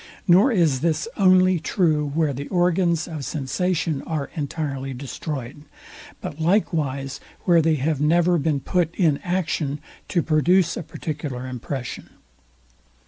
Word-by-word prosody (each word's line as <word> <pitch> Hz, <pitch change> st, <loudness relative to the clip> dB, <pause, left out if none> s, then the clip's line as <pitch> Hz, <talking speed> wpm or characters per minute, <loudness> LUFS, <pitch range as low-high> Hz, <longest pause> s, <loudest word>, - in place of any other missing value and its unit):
Nor 195 Hz, +9 st, +6 dB
is 165 Hz, -, +2 dB
this 160 Hz, +3 st, 0 dB
only 185 Hz, -2 st, +4 dB
true, 155 Hz, -3 st, +1 dB
where 150 Hz, 0 st, 0 dB
the 140 Hz, +2 st, -6 dB
organs 175 Hz, -2 st, +1 dB
of 155 Hz, -4 st, -6 dB
sensation 155 Hz, +3 st, -1 dB
are 155 Hz, -4 st, -3 dB
entirely 140 Hz, -3 st, -3 dB
destroyed, 140 Hz, 0 st, -6 dB, 0.6 s
but 150 Hz, -, -6 dB
likewise 150 Hz, -7 st, 0 dB, 0.2 s
where 170 Hz, -3 st, +4 dB
they 160 Hz, 0 st, +2 dB
have 145 Hz, +1 st, -1 dB
never 170 Hz, +3 st, +3 dB
been 145 Hz, -2 st, 0 dB
put 170 Hz, 0 st, 0 dB
in 160 Hz, -7 st, +2 dB
action 160 Hz, -5 st, -2 dB, 0.3 s
to 170 Hz, -4 st, 0 dB
produce 170 Hz, +3 st, +3 dB
a -, -, -4 dB
particular 145 Hz, -5 st, -5 dB
impression. 130 Hz, 0 st, -6 dB
160 Hz, 130 wpm, -23 LUFS, 140-175 Hz, 0.6 s, Nor